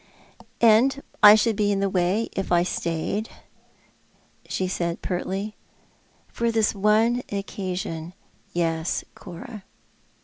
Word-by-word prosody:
"And 240 +5 +4 0.2
I 210 -1 +10
should 220 0 +2
be 205 0 +1
in 200 - 0
the 200 - +1
way 190 +4 0
if 195 - -3
I 175 0 +4
stayed," 175 +5 -2 1.2
she 185 - -1
said 170 -1 -3
pertly. 195 +3 -3 0.4
" - - -37 0.3
For 235 0 -1
this 220 -2 +2
one 215 +4 +2
occasion, 185 -4 -4 0.4
yes, 165 -1 -1
Cora." 190 +3 -10
195 Hz, 115 wpm, -24 LUFS, 175-215 Hz, 1.2 s, I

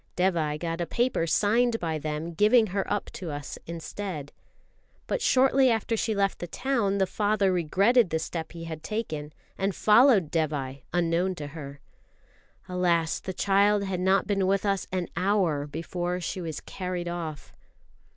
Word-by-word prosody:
Dévai 165 -5 +1
got 165 0 -3
a 170 - -2
paper 240 -8 0
signed 225 +7 +2
by 160 -2 -2
them 155 +3 -4
giving 215 +6 +5
her 195 -1 -1
up - - -2
to 180 - -6
us 145 -1 -6
instead. 170 -2 -6 0.7
But - - -2
shortly 265 0 +4
after 225 0 0
she 220 0 -1
left 200 -1 0
the 175 - -5
town, 230 -2 0
the 190 - +3
father 205 0 +1
regretted 195 +6 +3
the 160 - 0
step 160 0 -5
he 165 -1 -8
had 160 -1 -6
taken, 160 -7 -4 0.3
and 195 0 0
followed 215 - +5
Dévai, 140 -4 -2
unknown 175 +2 +1
to 150 - -6
her. 140 -2 -9 0.9
Alas, 175 -3 +1
the 190 - -5
child 200 +2 +3
had 190 -2 -2
not 190 +2 +3
been 195 -2 +1
with 195 +1 +1
us 195 -1 0
an 185 -2 -1
hour 180 -6 +1
before 175 +4 -3
she 180 +2 -4
was 160 -3 -5
carried 180 -2 -4
off. 165 -4 -5
180 Hz, 160 wpm, -27 LUFS, 160-205 Hz, 0.9 s, giving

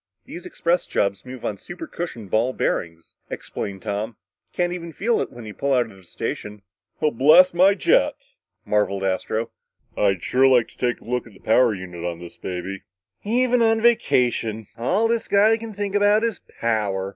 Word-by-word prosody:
"These 175 - -8
express 170 +1 0
jobs 100 +4 -1
move 130 -1 -8
on 105 - -2
supercushioned 165 - -7
ball 120 +4 +2
bearings," 85 -7 -3 0.2
explained 95 -1 -6
Tom. 105 +1 -3 0.3
"You - - -34
can't 175 0 +1
even 170 -2 -6
feel 225 +8 0
it - - -4
when 120 -2 -10
you 105 - -7
pull 140 +4 -1
out 125 -1 +3
of - - -15
the 95 - -17
station." 105 +3 -6 0.4
"Blast 155 +7 +5
my 190 +3 +5
jets!" - - +1 0.3
marveled 100 -2 0
Astro. 110 +4 -1 0.4
"I'd 95 -3 +1
sure 130 +1 +4
like 125 -3 +4
to - - -21
take 120 -1 -1
a - - -17
look 125 +1 -2
at 110 - -16
the 95 - -18
power 115 0 +3
unit 90 -2 -8
on 85 -1 -3
this 85 0 -11
baby." 95 +1 -5 0.4
"Even 245 +3 +2
on 225 -1 +4
a 225 - -4
vacation, 120 - +2
all 180 - +1
this 230 0 -1
guy 210 +2 +4
can 225 0 -7
think 205 -1 -4
about 205 +1 +4
is 230 -2 -1 0.2
power!" 100 -4 0
125 Hz, 185 wpm, -23 LUFS, -, 0.4 s, Blast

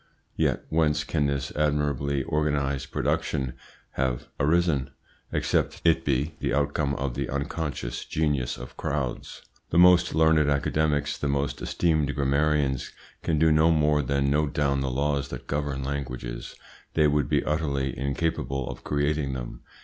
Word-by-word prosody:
Yet - - 0
whence 75 -2 +2
can 75 -3 0
this 70 0 -2
admirably 70 -2 0
organised 70 -3 -1
production 65 -3 -1 0.4
have 65 -2 -2
arisen, 80 -2 +2 0.4
except - - 0
it 80 -1 +4
be 70 +2 0
the 65 - 0
outcome 70 0 0
of 65 -2 -2
the - - -3
unconscious 70 -3 -3
genius 75 -5 -1
of 60 - -9
crowds? 70 -4 -3 0.3
The 80 - 0
most 90 -1 +6
learned 80 -2 +4
academics, 75 +1 0
the 75 - -1
most 70 0 -1
esteemed 80 -4 +1
grammarians 70 -1 +1 0.3
can 80 - 0
do 80 +1 +4
no 80 +2 +5
more 75 -2 +3
than 70 +1 0
note 75 0 +1
down 70 -3 +1
the 65 - -1
laws 70 +2 0
that 65 0 -7
govern 70 -1 -2
languages; 65 -3 -5 0.4
they 80 - +4
would 75 -3 +1
be - - +1
utterly 70 -4 -1
incapable 70 -2 -2
of - - -11
creating 70 -1 0
them. - - -6
70 Hz, 145 wpm, -26 LUFS, 70-75 Hz, 0.4 s, most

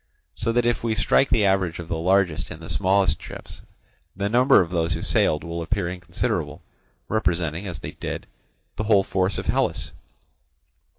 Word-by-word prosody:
So 115 - 0
that 120 0 +2
if 120 -1 +1
we 115 -2 0
strike 120 +5 +3
the 105 - +3
average 95 -3 +1
of 85 - -7
the 85 - -2
largest 90 0 +1
and 80 +1 -9
smallest 95 0 +2
ships, - - -10 0.5
the 100 +1 -1
number 125 +4 +5
of 85 -2 0
those 85 -1 0
who 80 - -5
sailed 75 -1 +1
will 85 0 -4
appear 95 +2 -1
inconsiderable, 90 -1 -3 0.4
representing, 90 -4 -1
as 90 -3 -4
they - - -7
did, - - -5 0.5
the 105 - -2
whole 105 -2 +4
force 95 0 0
of - - -4
Hellas. - - 0
95 Hz, 170 wpm, -24 LUFS, 85-105 Hz, 0.5 s, number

